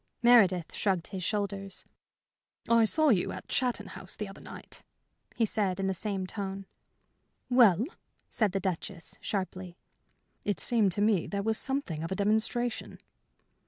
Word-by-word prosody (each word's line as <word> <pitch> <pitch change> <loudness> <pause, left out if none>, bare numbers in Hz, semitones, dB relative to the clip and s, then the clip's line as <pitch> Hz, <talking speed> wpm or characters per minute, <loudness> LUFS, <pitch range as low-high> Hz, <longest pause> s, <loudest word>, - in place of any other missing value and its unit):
Meredith 195 -9 +5
shrugged 190 -5 -1
his 190 -2 -5
shoulders. 200 -1 -3 0.8
"I 230 -1 +5
saw 310 +7 +3
you 195 -8 +2
at - - -8
Chatton 240 -6 0
House 185 - -6
the 210 - -4
other 195 - -11
night," - - -10 0.5
he 230 - +2
said, 200 -4 -1
in 195 - -1
the 190 - +1
same 195 0 0
tone. 195 0 -5 0.9
"Well?" 230 -4 +6 0.4
said 215 -4 0
the 195 - -1
Duchess, 185 -1 -5
sharply. 185 -3 -4 0.7
"It 205 -2 -1
seemed 220 -5 +2
to 205 - -2
me 210 -5 +2
there 200 -1 -3
was 220 0 +1
something 265 - -1
of 165 - -5
a - - 0
demonstration." 220 +4 0
200 Hz, 150 wpm, -29 LUFS, 190-220 Hz, 0.9 s, Well